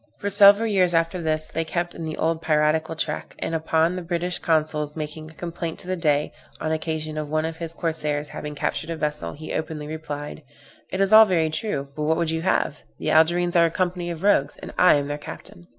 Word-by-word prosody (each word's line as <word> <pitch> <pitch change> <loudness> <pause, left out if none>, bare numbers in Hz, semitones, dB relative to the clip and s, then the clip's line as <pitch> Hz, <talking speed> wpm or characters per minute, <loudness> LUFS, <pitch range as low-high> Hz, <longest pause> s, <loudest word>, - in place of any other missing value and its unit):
For 200 - -3
several 200 +2 +7
years 185 -5 +2
after 165 +2 +1
this 155 -1 0
they 165 - -2
kept 175 +1 -3
in 165 - -6
the 155 -1 -4
old 165 0 0
piratical 155 0 +1
track; 160 - -4
and - - -4
upon 160 +2 +1
the 185 - -4
British 175 +1 -2
consuls 155 -2 0
making 155 0 -6
a 160 - -17
complaint 170 -1 -5
to - - -8
the 185 - 0
Dey, 150 -4 +1 0.3
on 155 - -2
occasion 155 -1 -3
of 150 -1 -5
one 155 +1 0
of 165 0 -4
his 165 -1 -6
corsairs 150 -3 -2
having 150 0 -6
captured 145 - -2
a 165 - -2
vessel, 150 - -3
he 155 +1 -7
openly 155 -1 -3
replied, 150 -1 -6 0.5
"It 190 - -2
is 195 +2 +3
all 220 0 +10
very 165 -5 +1
true, 155 -5 -3
but 150 - -5
what 160 +2 +2
would 170 -2 0
you 160 0 -1
have? 165 -4 0 0.2
the - - -2
Algerines 175 +2 +3
are 170 -1 +6
a - - -1
company 175 0 -2
of 170 +1 -6
rogues, 145 -9 +3
and - - -9
I 180 - +6
am 145 -1 0
their 145 0 -4
captain." 85 -10 -10
160 Hz, 225 wpm, -24 LUFS, 155-175 Hz, 0.5 s, all